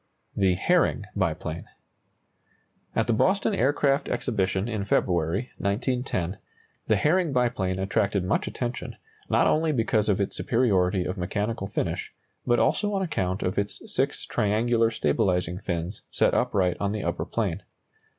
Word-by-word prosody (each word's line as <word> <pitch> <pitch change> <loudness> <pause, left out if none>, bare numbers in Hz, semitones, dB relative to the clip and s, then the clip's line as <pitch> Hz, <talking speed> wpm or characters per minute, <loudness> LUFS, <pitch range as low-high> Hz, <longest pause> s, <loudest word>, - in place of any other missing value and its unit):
THE 95 -2 +3
HERRING 125 - +2
BIPLANE. 85 -3 -2 1.3
At - - +2
the 115 - +1
Boston 195 - +2
Aircraft 140 -3 +2
Exhibition 95 -4 0
in 110 -4 -2
February, 90 +3 0
1910, 100 -4 -1 0.5
the 110 - +4
Herring 160 - +2
biplane 120 -8 0
attracted 100 0 0
much 90 - 0
attention, 120 -1 -4 0.3
not - - +3
only 160 0 +2
because 110 -5 +1
of 100 - +2
its 100 - -1
superiority 95 -6 +2
of 90 +1 -3
mechanical 105 +3 -2
finish, - - -3 0.3
but 120 -1 +4
also 205 - +2
on 195 - 0
account 95 - -1
of 90 +2 0
its 100 0 -2
six - - 0
triangular 115 +2 +2
stabilizing 90 -1 0
fins 90 0 -4
set - - +2
upright 90 -3 +1
on 100 0 -1
the 105 - -3
upper - - -1
plane. - - -2
100 Hz, 140 wpm, -26 LUFS, 95-120 Hz, 1.3 s, the